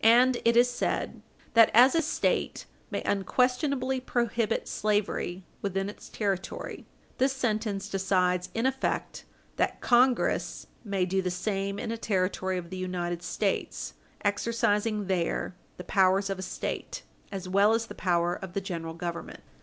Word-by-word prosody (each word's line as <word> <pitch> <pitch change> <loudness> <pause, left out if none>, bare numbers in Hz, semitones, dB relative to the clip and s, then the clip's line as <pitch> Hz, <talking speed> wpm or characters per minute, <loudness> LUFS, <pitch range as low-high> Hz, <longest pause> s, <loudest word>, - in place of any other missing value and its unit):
And 240 +3 +6
it 230 0 +4
is 245 +1 +7
said 245 0 -2 0.3
that, 230 -1 +7
as 250 +3 +8
a 330 - +3
State 310 - 0 0.2
may - - -3
unquestionably 255 - +1
prohibit 235 -3 0
slavery 205 -3 -1 0.2
within 195 0 -1
its - - -14
territory, 195 -3 -3 0.3
this 265 +1 +3
sentence 215 -6 -1
decides 185 -2 +1
in 230 +2 0
effect 265 0 -1 0.3
that - - 0
Congress 250 0 +2 0.2
may 200 -4 0
do 190 +1 0
the 185 - -1
same 195 +2 -2
in 225 +1 -3
a 230 - -2
Territory 185 -2 0
of 170 -1 -6
the 185 - -4
United 175 -2 -3
States, - - -2 0.3
exercising 210 0 +1
there 180 0 -1 0.2
the 180 - -7
powers 195 +1 +3
of 195 - -3
a - - -3
State - - -4 0.3
as 190 -2 -5
well 200 +4 +4
as 230 0 -1
the - - -9
power 175 -1 +1
of 185 0 -7
the 200 - 0
General 165 -4 -5
Government. 170 0 -6
200 Hz, 150 wpm, -28 LUFS, 185-235 Hz, 0.3 s, as